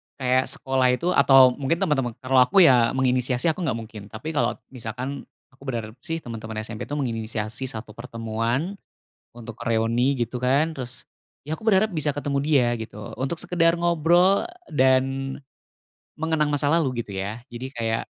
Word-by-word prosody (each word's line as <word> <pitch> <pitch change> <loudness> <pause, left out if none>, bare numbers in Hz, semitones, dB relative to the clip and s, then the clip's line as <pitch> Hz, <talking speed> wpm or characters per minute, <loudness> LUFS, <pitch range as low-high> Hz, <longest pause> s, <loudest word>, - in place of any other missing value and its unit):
kayak 130 0 +1
sekolah 130 -1 +2
itu 175 +6 -1
atau 135 -2 +7
mungkin 140 +3 0
teman-teman 135 -9 0
kalau, 130 0 +1
aku, 190 +10 +4
ya, 125 -7 +5
menginisiasi, 130 +2 +1
aku 170 +2 -2
nggak 130 - 0
mungkin, 110 -2 -10
tapi 110 +9 -6
kalau 150 -2 0 0.2
misalkan 125 +3 -6 0.2
aku 135 +1 -18
berharap, 115 -2 -5
sih, 165 -1 -3
teman-teman 110 -2 -6
SMP, 110 0 -6
tuh, 145 +3 -3
menginisiasi 115 -1 -3
satu 115 -3 -7
pertemuan, 115 - -3 0.6
untuk 115 -2 -10
reuni, 115 +4 +2
gitu, 120 +2 -6
kan, 140 +6 +2
terus, 130 -4 -7 0.4
ya, 155 +2 -5
aku 220 - -10
berharap 215 +1 +4
bisa 150 -4 0
ketemu 145 -1 -1
dia, 140 -4 +3
gitu, 105 -2 -8
untuk 135 +6 -1
sekedar 165 -1 +2
ngobrol 175 - +3 0.2
dan 135 0 +2 0.8
mengenang 155 -2 0
masa 145 0 +1
lalu, 140 -7 +1
gitu, 100 -4 -8
ya. 105 +5 -4
Jadi 130 +3 -7
kayak 115 -1 -1
130 Hz, 160 wpm, -24 LUFS, 115-150 Hz, 0.8 s, atau